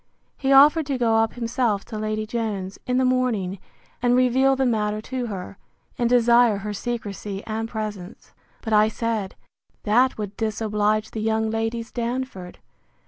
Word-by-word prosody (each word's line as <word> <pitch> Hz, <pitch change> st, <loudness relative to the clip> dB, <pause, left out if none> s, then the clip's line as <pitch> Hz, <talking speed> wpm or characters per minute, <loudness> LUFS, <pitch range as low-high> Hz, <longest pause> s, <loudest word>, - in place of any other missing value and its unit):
He 270 Hz, -1 st, -1 dB
offered 290 Hz, +3 st, +6 dB
to 275 Hz, -3 st, -1 dB
go 225 Hz, -2 st, +3 dB
himself 230 Hz, -3 st, -1 dB
to 215 Hz, -2 st, -6 dB
Lady 215 Hz, 0 st, -2 dB
Jones, 210 Hz, -4 st, -4 dB
in 250 Hz, 0 st, +1 dB
the 260 Hz, -, +3 dB
morning, 235 Hz, -7 st, 0 dB, 0.4 s
and 245 Hz, 0 st, +3 dB
reveal 255 Hz, +2 st, +3 dB
the 265 Hz, 0 st, +1 dB
matter 215 Hz, -3 st, 0 dB
to 250 Hz, +2 st, -4 dB
her, 195 Hz, -1 st, -7 dB, 0.4 s
and 240 Hz, -1 st, 0 dB
desire 240 Hz, -2 st, +5 dB
her 210 Hz, +1 st, -5 dB
secrecy 205 Hz, -3 st, -5 dB
and 225 Hz, +1 st, -3 dB
presence; 210 Hz, -3 st, -7 dB, 0.3 s
but 220 Hz, -, -2 dB
I 210 Hz, 0 st, +5 dB
said, 220 Hz, -3 st, -3 dB, 0.5 s
That 245 Hz, +5 st, +3 dB
would 205 Hz, -2 st, -5 dB
disoblige 215 Hz, -1 st, 0 dB
the 220 Hz, -, -4 dB
young 220 Hz, 0 st, 0 dB
Ladies 225 Hz, +1 st, -3 dB
Darnford. 235 Hz, -6 st, -4 dB
225 Hz, 150 wpm, -23 LUFS, 210-245 Hz, 0.5 s, offered